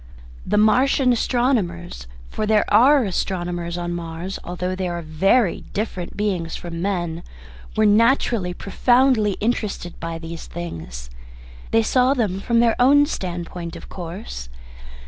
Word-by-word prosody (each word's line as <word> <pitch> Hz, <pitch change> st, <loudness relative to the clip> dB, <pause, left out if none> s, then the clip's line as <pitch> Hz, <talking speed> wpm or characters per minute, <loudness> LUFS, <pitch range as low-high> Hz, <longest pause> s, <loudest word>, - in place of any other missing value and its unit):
The -, -, +1 dB
Martian 250 Hz, +4 st, +4 dB
astronomers 200 Hz, -, -1 dB, 0.2 s
for 215 Hz, -, -2 dB
there 215 Hz, -1 st, +3 dB
are 265 Hz, +6 st, +6 dB
astronomers 175 Hz, -3 st, -2 dB
on 175 Hz, 0 st, -3 dB
Mars, 170 Hz, +2 st, -5 dB
although 180 Hz, +1 st, -3 dB
they 185 Hz, -1 st, -2 dB
are 175 Hz, -1 st, -4 dB
very 190 Hz, +7 st, +2 dB
different 195 Hz, -4 st, -4 dB
beings 185 Hz, -6 st, -1 dB
from 170 Hz, -1 st, -6 dB
men 175 Hz, -4 st, -2 dB, 0.6 s
were 215 Hz, -, +4 dB
naturally 225 Hz, -3 st, +3 dB
profoundly 240 Hz, +1 st, +2 dB
interested 210 Hz, -5 st, -3 dB
by 165 Hz, 0 st, -4 dB
these 165 Hz, 0 st, -8 dB
things. 80 Hz, -, -7 dB, 0.6 s
They 225 Hz, 0 st, +3 dB
saw 255 Hz, +4 st, +3 dB
them 205 Hz, -7 st, 0 dB
from 230 Hz, +3 st, +2 dB
their 230 Hz, -1 st, +3 dB
own 285 Hz, +3 st, +6 dB
standpoint 175 Hz, -, -5 dB
of -, -, -11 dB
course. 170 Hz, -, -7 dB
190 Hz, 130 wpm, -22 LUFS, 170-230 Hz, 0.6 s, are